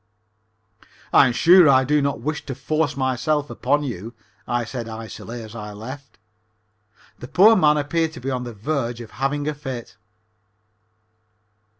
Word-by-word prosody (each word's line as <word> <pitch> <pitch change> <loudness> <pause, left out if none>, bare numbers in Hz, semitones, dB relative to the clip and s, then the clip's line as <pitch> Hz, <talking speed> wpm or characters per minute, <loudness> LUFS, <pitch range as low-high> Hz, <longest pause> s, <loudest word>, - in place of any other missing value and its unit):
"I - - +7
am - - 0
sure 170 +4 +6
I 130 -1 +5
do 150 +3 +2
not 140 0 -1
wish 150 +1 -3
to 135 - -4
force 145 +1 -1
myself 140 +3 0
upon 145 +1 0
you," 115 -3 -6 0.3
I 120 0 -1
said 120 0 -6
icily 115 +1 -8
as 110 0 -11
I 105 -2 -7
left. 130 +7 -10 1.0
The 120 - -8
poor 210 - +6
man 150 -6 +4
appeared 160 +2 -1
to - - -9
be 135 +2 -4
on 125 -1 -2
the 120 - -6
verge 120 0 -2
of 115 -2 -10
having 145 +2 -2
a 150 - 0
fit. 130 -8 -7
135 Hz, 160 wpm, -22 LUFS, 120-150 Hz, 1.0 s, I